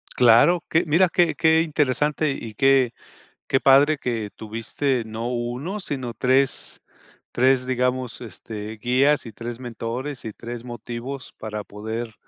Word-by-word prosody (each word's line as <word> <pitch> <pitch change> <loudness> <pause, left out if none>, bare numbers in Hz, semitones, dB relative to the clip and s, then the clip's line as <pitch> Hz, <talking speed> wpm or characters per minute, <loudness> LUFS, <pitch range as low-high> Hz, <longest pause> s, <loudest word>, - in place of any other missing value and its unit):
Claro 125 +9 +5
que, 160 - +3
mira 170 +4 +4
qué 170 -3 +3
qué 160 +2 +4
interesante 150 -1 +1
y 115 -5 -6
qué 135 -1 +4 0.6
qué 135 - +2
padre 140 +3 +5
que 115 -5 -3
tuviste 115 +4 -2
no 110 +2 -4
uno 125 - -3
sino 130 - -4
tres, 130 +4 +1 0.5
tres 130 +1 +3
digamos 125 -2 -1
este 110 0 -7
guías 130 +5 +2
y 115 - -8
tres 115 +2 -6
mentores 125 +3 -5
y 110 - -5
tres 120 +2 -8
motivos 120 +3 -7
para 105 -1 -5
poder 110 +3 -6
125 Hz, 135 wpm, -23 LUFS, 115-140 Hz, 0.6 s, Claro